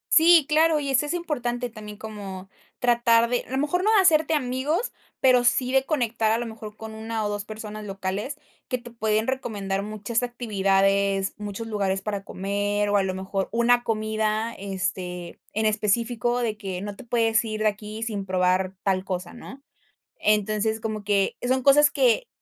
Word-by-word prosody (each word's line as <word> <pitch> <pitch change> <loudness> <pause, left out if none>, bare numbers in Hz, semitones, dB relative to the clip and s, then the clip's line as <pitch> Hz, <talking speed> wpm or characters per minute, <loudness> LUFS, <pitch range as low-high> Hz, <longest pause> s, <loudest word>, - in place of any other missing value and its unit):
Sí, 330 -1 +7
claro, 315 0 +4
y 280 -1 -2
eso 270 +2 +2
es 295 - -2
importante 245 -8 -2
también 210 -2 -9
como 195 -3 -8 0.3
tratar 235 -1 +4
de 245 - 0
a - - -12
lo 265 - 0
mejor, 355 +6 0
no 435 - +4
de 415 - +7
hacerte 320 -4 +4
amigos, 285 - -1 0.3
pero, 250 -2 +5
sí 250 +1 +2
de 265 0 +3
conectar, 230 -7 0
a 225 - +1
lo 240 - -3
mejor, 220 -1 -9
con 220 0 -8
1 220 0 -3
o - - 0
2 205 -1 -3
personas 215 0 -7
locales, 195 +7 -4 0.3
que 255 - -2
te 240 0 -12
pueden 220 -1 0
recomendar 200 -7 -2
muchas 215 +3 -2
actividades, 195 -4 +1
muchos 210 +2 -6
lugares 195 -3 -1
para 200 -1 -3
comer, 205 +2 -1
o 205 - +2
a 195 - +3
lo 190 -1 -2
mejor 190 +1 -3
una 240 +1 +3
comida, 215 0 -1
este, 185 -2 -4
en 220 - -1
específico 230 +3 +1
de 225 -3 -1
que, 190 -4 -5
no 205 0 -6
te - - -11
puedes 230 -2 +2
ir 215 -1 -4
de 215 - +4
aquí 210 +1 -5
sin 210 -4 -3
probar 185 0 +1
tal 190 -1 0
cosa, 180 -2 -4
¿no? 265 +3 -11 0.5
Entonces, 215 - +1
como 215 -2 -4
que, 200 -1 +1
son 260 0 +1
cosas 290 +2 +6
que - - +2
220 Hz, 180 wpm, -25 LUFS, 200-245 Hz, 0.5 s, Sí